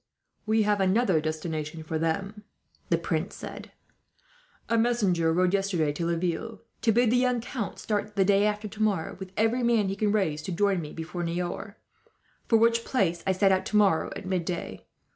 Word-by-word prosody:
"We 220 0 +3
have 205 -1 +1
another 190 -3 +3
destination 155 0 -4
for 160 0 -3
them," 195 +6 -2 0.5
the - - +3
prince - - -2
said. - - -8 1.0
"A 230 - +1
messenger 205 -8 +2
rode 180 +2 +2
yesterday 190 -6 +1
to 165 +3 -2
Laville, 175 +6 -2 0.2
to 225 - +3
bid 235 +1 +3
the 250 - +4
young 250 -1 +2
count 230 -2 -5
start, 210 -1 -3
the 195 -2 +3
day 200 +1 +4
after 210 0 -2
tomorrow, 210 -5 -1
with 190 -1 -8
every 225 +3 +2
man 230 -4 +2
he 195 - -2
can 210 +1 +1
raise, 165 -8 0
to 185 - -5
join 195 +1 +1
me 150 -1 -7
before 165 +2 -6
Niort; 175 +4 -3 0.7
for 225 - +5
which 230 +1 +3
place 175 -11 0
I - - +4
set 195 +1 +3
out, 190 0 +2
tomorrow 205 -6 +2
at - - -7
midday. 180 -2 -3
195 Hz, 180 wpm, -27 LUFS, 170-215 Hz, 1.0 s, for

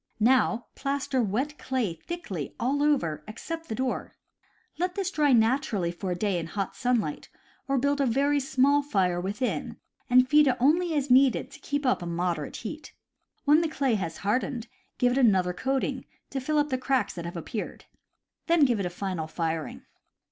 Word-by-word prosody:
Now 240 0 +3
plaster 275 -2 -1
wet 255 +8 -2
clay 255 -9 -1
thickly 190 - -6
over 275 - +1
all - - -29
except 325 +9 -6
the 220 - -2
door. 260 +1 -3 0.6
Let 360 +1 -1
this 385 -2 -1
dry 300 -5 +2
naturally 225 -6 +2
for 185 +2 -5
a 180 - 0
day 190 -1 0
in 165 - -5
hot 195 +3 -4
sunlight, 240 - -1 0.4
or 275 0 +1
build 285 +2 +1
a 275 - +2
very 280 +4 +2
small 280 +1 +3
fire 185 -10 0
within 205 +7 -3 0.3
and 255 +1 +6
feed 300 +2 +5
it 255 -1 +2
only 320 +6 +3
as 280 -3 0
needed 260 0 +4
to 320 - -12
keep 285 0 -3
up 250 - +2
a 175 - -5
moderate 170 -2 -2
heat. 300 +8 -7 0.5
When 300 +3 +6
the 330 - 0
clay 275 -5 0
has 170 -6 -2
hard 225 +6 +3
ened, 240 -4 -5 0.3
give 245 0 +3
it 260 - +1
another 190 -7 +3
coating, 265 +5 -2 0.3
to 275 - -2
fill 305 +4 0
up 295 0 +2
the 260 -2 -1
cracks 265 0 0
that 170 -1 -6
have 170 +1 -5
appeared. 205 +6 -6 0.6
Then 335 -3 +5
give 240 -5 +1
it 190 - -1
a - - -4
final 180 -3 -4
firing. 160 -1 -3
255 Hz, 185 wpm, -27 LUFS, 195-285 Hz, 0.6 s, and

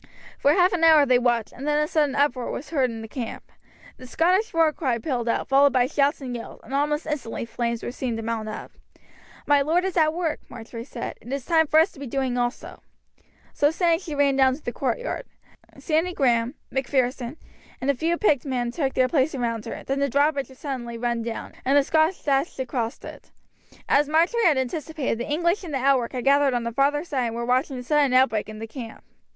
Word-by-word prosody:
For 285 - +4
half 360 +2 +4
an 340 -2 0
hour 315 -3 +7
they 255 -2 +4
watched, 240 -3 0
and 275 +3 -7
then 295 0 +2
a 300 - +1
sudden 295 -3 +1
uproar 280 -3 +1
was 295 - -6
heard 270 -5 +2
in 225 -1 -7
the - - -7
camp. 230 +1 -7 0.5
The 255 - -11
Scottish 365 - +2
war 325 -2 +3
cry 260 -7 -1
pealed 240 -1 -2
out, - - -1
followed 275 +1 +4
by 250 -2 +4
shouts 285 +2 +1
and 250 -2 -5
yells, 230 - -8
and - - -10
almost 295 +2 0
instantly 275 -7 -4
flames 235 0 -3
were - - -3
seen 245 -2 -3
to 225 - -5
mount 220 -1 -3
up. 215 - -7 0.7
"My 290 -1 +4
lord 330 +6 +1
is 380 - -2
at 310 -2 +4
work," 335 -3 -1
Marjory 230 +1 -8
said, 240 -3 -7
"it 240 - -10
is 275 -2 -3
time 320 -2 +3
for 310 - +5
us 330 +5 +3
to - - -16
be 280 - -6
doing 260 0 -1
also." 245 +1 -3 0.7
So 290 - +3
saying 330 0 +2
she 330 -6 -6
ran 280 -1 +3
down 265 -1 +4
to 295 - -15
the - - -3
courtyard. - - -3 0.5
Sandy 335 +2 0
Grahame, 245 -1 +1 0.2
Macpherson, 260 0 -1 0.4
and 265 +2 +1
a - - -2
few 330 +6 -1
picked 300 - +2
men 245 -4 -2
took 270 0 -2
their 255 - +3
place 280 +1 +1
around 230 -3 -2
her, 230 - -6
then 270 +1 -2
the 280 0 +1
drawbridge 285 +1 +1
was 260 - -15
suddenly 245 -5 -5
run 235 0 -1
down, 230 0 -6
and 275 +2 +3
the 285 - +5
Scots 315 +5 +1
dashed 280 +2 0
across 245 -3 -3
it. - - -11 0.6
As 290 0 +3
Marjory 345 +10 +2
had 315 -6 +4
anticipated, 275 -1 -2
the 240 - -4
English 340 +6 +1
in 350 - -7
the 285 - -1
outwork 260 -2 +2
had 250 -2 -3
gathered 275 -1 +4
on 240 - -1
the 235 - -3
farther 280 +4 +1
side 275 -7 -2
and 230 - -5
were 235 0 -3
watching 255 +2 0
the 250 - -6
sudden 285 -1 +2
outbreak 225 -5 +3
in 215 - -8
the 225 - -6
camp. 225 -1 -9
275 Hz, 225 wpm, -24 LUFS, 245-305 Hz, 0.7 s, hour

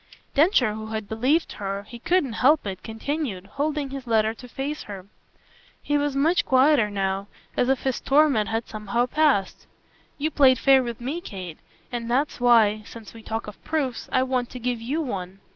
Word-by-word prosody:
Densher, 285 - +4
who 220 0 -6
had 220 -1 -4
believed 260 +10 +1
her 200 0 -4
he 235 +3 -11
couldn't 295 -3 +1
help 295 +2 +4
it 190 -2 -5
continued, 225 -3 -4
holding 285 +5 -2
his 270 -2 -7
letter, 220 -1 +2
to 250 +2 -12
face 275 +5 -4
her. 195 -3 -8 0.7
He 290 - -2
was 290 -1 0
much 315 +6 +3
quieter 260 -4 +4
now, 195 0 -2 0.3
as 245 - +1
if 265 -1 +2
his 265 -2 -1
torment 275 -7 +3
had 225 +1 -2
somehow 215 +2 -1
passed. 270 -8 +1 0.5
"You 310 +2 -1
played 265 -3 +5
fair 270 +1 +5
with 235 -2 -5
me, 285 +8 -3
Kate; 185 - -8 0.3
and 235 -1 -4
that's 270 +5 0
why 220 -3 +5
since 220 0 -11
we 225 - -11
talk 225 +1 -4
of 210 - -11
proofs 280 -6 -2
I 255 - +3
want 255 -2 -1
to 250 - -8
give 245 -1 -2
YOU 280 +8 -2
one. 195 -7 -5
245 Hz, 185 wpm, -24 LUFS, 215-280 Hz, 0.7 s, played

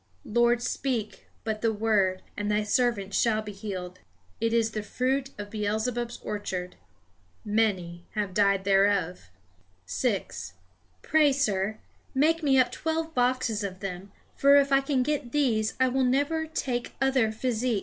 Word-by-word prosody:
Lord, 240 +1 +2
speak 240 -6 -3 0.2
but 215 -1 -3
the 225 - +2
word, 205 -4 +1
and 205 0 -2
Thy 210 0 +1
servant 210 -3 0
shall 220 0 +2
be 210 - -6
healed." 190 -3 -6 0.4
It 230 - +1
is 225 -1 +2
the 215 - -3
fruit 260 +5 -1
of 205 0 -7
Beelzebub's 220 +3 -2
orchard. 185 -4 -4 0.7
Many 190 -6 0
have 205 -3 -2
died 200 -1 +3
thereof. 195 - +2 0.6
6. 90 0 -2 0.5
"Pray, 305 -2 +4
sir, 215 -6 0 0.4
make 320 +5 +3
me 275 -3 +3
up 255 -1 +4
twelve 320 0 -2
boxes 245 -4 +1
of 190 -2 -5
them; 190 0 -6 0.2
for 280 +1 +5
if 280 -1 +4
I 275 0 +5
can 270 -2 +1
get 285 -4 -2
these, 230 -7 +1
I 260 - +4
will 260 +1 +1
never 285 +5 +1
take 250 -6 -3
other 265 -5 +2
physic." 235 -1 -1
225 Hz, 150 wpm, -27 LUFS, 205-260 Hz, 0.7 s, for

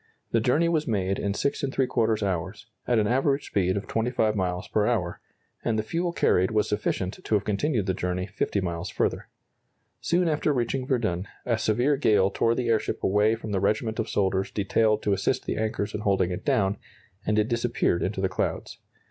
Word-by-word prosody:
The 115 - +3
journey 150 +9 +2
was 160 -2 0
made 95 -4 0
in 100 -1 -1
6¾ 125 -4 0
hours, 95 +3 -3 0.2
at 120 - +3
an 105 - +3
average 135 +5 +1
speed 95 -1 0
of 100 - -4
25 115 -2 0
miles 90 -2 -2
per 105 -1 +1
hour, 90 -8 -1 0.4
and 115 -2 0
the 110 - 0
fuel 170 +8 -1
carried 95 - +2
was 110 -1 +1
sufficient 100 -2 -2
to 110 - +1
have 100 - +1
continued 110 +1 0
the 95 - 0
journey 90 0 -2
50 100 0 -2
miles 85 0 -3
further. - - -1 0.7
Soon 175 0 +1
after 155 -1 +1
reaching 130 +1 -1
Verdun 110 -9 0 0.2
a 120 - +2
severe 125 +7 +2
gale 100 -7 +3
tore 115 0 +1
the 125 -1 -1
airship 110 -2 0
away 105 +3 +3
from 110 -1 -7
the 100 - +1
regiment 110 +3 0
of 110 - -1
soldiers 95 -1 0
detailed 105 +1 +1
to 100 - +2
assist 95 - 0
the - - -2
anchors 110 -2 -2
in - - -3
holding 95 -3 +1
it 90 - -4
down, 100 -1 +1 0.5
and 105 - 0
it 105 0 +3
disappeared 120 -7 0
into 95 +1 -2
the 95 - +2
clouds. 95 - -3
105 Hz, 190 wpm, -26 LUFS, 95-120 Hz, 0.7 s, The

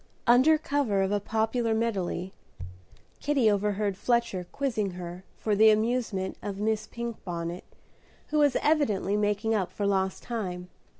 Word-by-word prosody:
Under 260 +6 +6
cover 280 -10 0
of 190 - -1
a 205 - +2
popular 225 +2 0
medley, 190 -5 -2 0.9
Kitty 275 -7 +3
overheard 205 0 0
Fletcher 235 -5 0
quizzing 220 -9 -1
her 175 0 -7
for 215 -2 0
the 220 +2 +7
amusement 215 -3 0
of 200 -1 -5
Miss 215 +1 -1
Pinkbonnet, 180 -7 -5 0.6
who 300 - +1
was 290 -2 +4
evidently 220 - +2
making 210 +1 +1
up 195 -5 0
for 205 - -3
lost 190 -1 0
time. 180 -6 -4
210 Hz, 135 wpm, -28 LUFS, 190-235 Hz, 0.9 s, the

